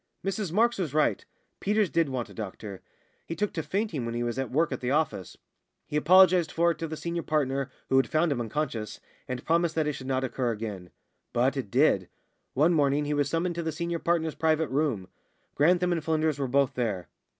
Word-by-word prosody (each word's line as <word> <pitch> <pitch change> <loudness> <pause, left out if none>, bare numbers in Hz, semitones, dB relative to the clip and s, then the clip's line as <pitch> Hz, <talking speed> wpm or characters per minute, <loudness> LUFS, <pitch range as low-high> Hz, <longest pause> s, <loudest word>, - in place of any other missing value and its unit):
Mrs 195 -2 -2
Marks 230 +4 +2
was 155 -6 -2
right. 155 - +2 0.4
Peters 210 -1 +1
did 165 -3 +2
want 125 -3 -3
a - - -14
doctor. 100 -2 -7 0.5
He 165 - -4
took 210 +2 -1
to 160 - -2
fainting 190 - -2
when 115 0 -3
he 120 - -1
was 120 +2 -2
at 135 -3 -2
work 160 +5 +1
at - - -4
the 125 - -1
office. 140 - -1 0.5
He - - -6
apologised 180 +1 +5
for 170 +1 +3
it 160 - -6
to 165 - -3
the 155 0 -5
senior 170 +1 -3
partner, 140 -4 0 0.2
who 135 - +3
had 135 - +3
found 160 +1 +2
him 125 -4 0
unconscious, 115 -3 -3 0.3
and 125 -1 -5
promised 165 0 +2
that 160 -1 +1
it 150 - 0
should 130 -1 -8
not 130 -1 0
occur 130 -2 -1
again. 105 -5 -6 0.4
But - - +2
it - - -4
did. - - +3 0.5
One 155 +6 +4
morning 145 -1 +2
he 150 - -1
was 145 -1 +1
summoned 175 +2 0
to 170 - -3
the 160 -1 -2
senior 170 +1 -3
partner's 165 -2 0
private 160 -1 +1
room. 130 -9 0 0.5
Grantham 175 +4 +3
and 165 -3 -1
Flynders 155 -2 0
were 135 - 0
both 135 +1 +2
there. 105 -8 -2
155 Hz, 215 wpm, -28 LUFS, 130-170 Hz, 0.5 s, apologised